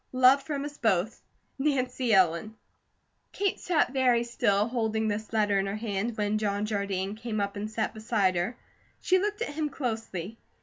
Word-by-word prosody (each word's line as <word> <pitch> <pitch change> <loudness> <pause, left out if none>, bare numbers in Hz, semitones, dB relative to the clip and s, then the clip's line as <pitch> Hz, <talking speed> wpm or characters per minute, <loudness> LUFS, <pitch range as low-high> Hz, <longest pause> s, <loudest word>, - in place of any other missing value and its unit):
Love 255 +2 +6
from 280 0 -3
us 290 0 -7
both, 215 -2 +1 0.4
NANCY 260 -3 0
ELLEN. 190 +2 +3 0.8
Kate 400 -1 0
sat 325 -6 +1
very 250 -3 +3
still, 210 -3 +1
holding 220 -2 0
this 215 +1 -3
letter 210 -3 +2
in 195 - -1
her 195 - -2
hand, 215 +1 -2
when 210 0 0
John 205 -1 0
Jardine 200 -2 -2
came 220 -1 -4
up 200 0 -2
and 205 +1 -4
sat 220 0 -2
beside 215 -4 +1
her. 180 +8 -1 0.4
She 370 0 +3
looked 420 +3 -1
at 295 - -5
him 305 0 -1
closely. 225 - -4
220 Hz, 170 wpm, -28 LUFS, 205-255 Hz, 0.8 s, Love